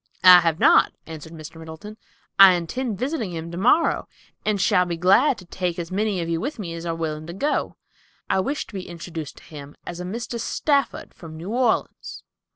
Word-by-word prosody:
"I 180 -1 +10
have 165 -2 0
not," - - +5
answered 160 -1 -9
Mr. 160 0 -10
Middleton. 160 +6 -10 0.4
"I 195 -1 +10
intend 200 +6 -3
visiting 255 - -3
him 165 0 -6
tomorrow, 225 - +2 0.4
and 210 -2 0
shall 190 -1 +3
be 175 -2 -4
glad, 215 - +4
to 180 - -12
take 175 0 -3
as 170 0 -5
many 205 0 0
of 165 - -3
you 165 0 -1
with 285 +7 -4
me 180 -6 -5
as 170 +1 -6
are 165 - -1
willing 155 -1 -4
to 170 - -6
go. 290 +11 -1 0.5
I - - +1
wish 280 +10 -2
to - - -17
be 190 -2 -6
introduced 165 -3 -7
to - - -15
him 145 -2 -11
as 175 0 -7
a - - -4
Mr. 230 +5 -5
Stafford 280 +4 -1
from 160 -2 -11
New 175 +6 -6
Orleans." 245 -1 -1
180 Hz, 200 wpm, -23 LUFS, 165-215 Hz, 0.5 s, I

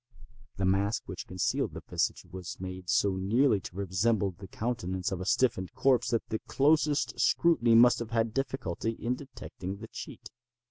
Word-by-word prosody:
The 95 - 0
mask 100 +3 +1
which - - -7
concealed 95 -1 -1
the - - -7
visage - - -1
was 90 -2 -8
made 95 -1 -7
so 100 -2 +2
nearly 110 +4 +3
to 90 - -10
resemble 100 +2 +1
the 95 +2 -12
countenance 95 -5 -3
of 95 -1 -3
a 95 - -5
stiffened 105 -8 +1
corpse 130 -3 +3
that 115 -2 -1
the 110 - -2
closest 150 +1 +2
scrutiny 140 -9 +4
must 120 +1 +6
have 115 -2 -5
had 115 -1 0
difficulty 130 -6 -2
in 115 +2 -2
detecting 115 -8 -7
the 115 +3 -9
cheat. - - -9
110 Hz, 170 wpm, -29 LUFS, 95-125 Hz, -, must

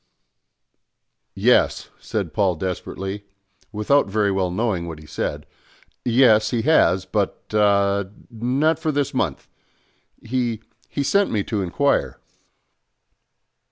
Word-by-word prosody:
"Yes," - - +2
said - - -4
Paul 95 -4 +1
desperately, 95 +3 -5 0.5
without 110 +6 +2
very 100 0 +1
well 95 -2 0
knowing 95 -3 -1
what 80 -2 -6
he 75 - -14
said, - - -4 0.6
"yes, 115 -3 +4
he 115 -3 -1
has, 95 - +3
but 100 +1 -2
ah, 100 -1 +3 0.3
not 135 +8 0
for 160 -1 -1
this 145 -2 -1
month; - - -2 0.8
he 120 -2 -2 0.3
he 140 - -2
sent 200 +8 +2
me 105 -3 0
to 105 -1 -2
inquire." 140 +11 0
105 Hz, 115 wpm, -22 LUFS, 95-125 Hz, 0.8 s, yes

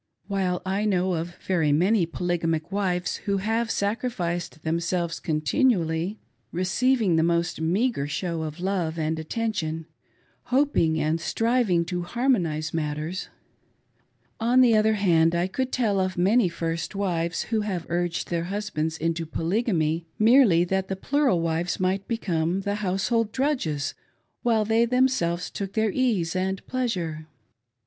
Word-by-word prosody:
While 190 -3 -1
I 195 +3 0
know 185 -2 +1
of 170 +1 -3
very 165 -6 +2
many 180 +4 +3
polygamic 165 -1 -1
wives 180 -3 -1
who 200 -1 +1
have 225 +4 0
sacrificed 185 -8 -2
themselves 170 +1 -1
continually, 165 - +1 0.3
receiving 195 +1 +2
the - - +4
most 170 0 0
meagre, 180 - +1
show 165 +2 -2
of 155 +1 -5
love 180 -3 -1
and 160 0 -1
attention, 165 -3 -2 0.6
hoping 255 - +2
and 155 +2 0
striving 225 -7 +1
to 175 +1 -3
harmonise 175 - 0
matters; 155 +3 -3 1.1
on 240 +3 +4
the 240 -3 +5
other 215 0 +3
hand 170 -4 +3
I 170 +1 +1
could 255 +7 -2
tell 215 -6 +1
of 185 -1 -1
many 195 +3 +3
first 165 +2 -3
wives 175 -4 -1
who 225 -2 -1
have 190 -5 -3
urged 175 0 -2
their 170 -1 0
husbands 175 -5 -2
into, 165 0 -2
Polygamy, 165 -2 0
merely 220 -6 +5
that 190 +1 -1
the 190 - -2
plural 265 - +1
wives 165 +1 -1
might 190 +1 0
become, 180 -5 -1
the 200 +1 -2
household 205 +4 0
drudges 250 - -1 0.5
while 225 -3 +2
they 225 +2 +3
thernselves 235 -9 +1
took 195 -1 -4
their 220 -1 +1
ease 205 -9 +1
an4T 190 +1 -2
pleasure. 180 -12 -2
180 Hz, 140 wpm, -25 LUFS, 165-215 Hz, 1.1 s, the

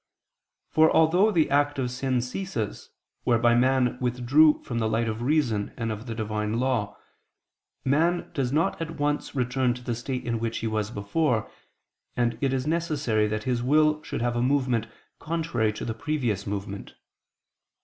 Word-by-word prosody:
For 160 0 +5
although 175 +6 +4
the 165 -9 +2
act 145 0 +2
of 125 -2 -1
sin 130 0 0
ceases, 125 - -4 0.3
whereby 120 0 +3
man 125 0 +2
withdrew 125 +5 +3
from 120 -2 -3
the 110 -1 0
light 115 +1 0
of 110 +1 -3
reason 120 -7 0
and 115 -1 -2
of 110 +3 -6
the 115 - -4
Divine 110 0 -2
law, 120 -6 -1 0.9
man 165 +6 +1
does 130 -3 -1
not 160 +2 0
at 165 0 -5
once 145 0 -1
return 125 -1 +1
to 125 - -10
the 120 - -2
state 125 +2 -4
in 115 -1 -1
which 115 0 -2
he - - -4
was 110 -1 -1
before, 115 +3 -1 0.7
and 120 -1 +1
it 135 -2 +1
is 130 0 -1
necessary 150 -9 0
that 110 0 -3
his 125 -1 0
will 150 +4 +3
should 145 -5 -4
have 120 0 0
a 120 - 0
movement 130 -3 +1 0.3
contrary 155 -10 -1
to - - -6
the 115 - -2
previous 115 -6 -2
movement. 100 0 -5
125 Hz, 170 wpm, -26 LUFS, 115-145 Hz, 0.9 s, For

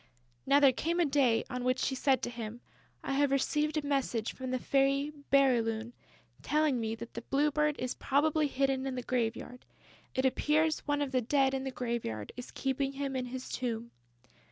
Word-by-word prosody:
Now 280 +1 +6
there 275 -2 +6
came 335 +7 -1
a 345 - +4
day 270 -5 +3
on 250 -1 -4
which 255 +1 +2
she 265 - 0
said 265 0 +2
to 240 - -2
him: 230 -1 -6 0.4
"I 275 - -2
have 285 +1 +3
received 295 +3 +1
a 300 - -1
message 265 -5 -1
from 260 -1 -6
the 255 - 0
Fairy 275 +3 +1 0.2
Bérylune 235 -4 +3 0.5
telling 300 -4 +1
me 225 0 -2
that 230 +1 -9
the 235 - -5
Blue 290 +5 +1
Bird 300 0 +1
is 255 0 -2
probably 300 +2 +1
hidden 270 -1 0
in 265 - -3
the 250 - -4
graveyard.... 245 0 -2 0.5
It 260 - +1
appears 305 +4 +2
that - - -15
one 290 0 +1
of 275 - -4
the 255 -2 +2
Dead 270 +2 +2
in 265 0 -2
the - - -1
graveyard 235 - -3
is 250 - -8
keeping 270 0 -2
him 275 -1 -3
in 255 -1 -1
his 255 +1 -6
tomb...." 235 -2 -3
265 Hz, 200 wpm, -31 LUFS, 245-285 Hz, 0.5 s, Now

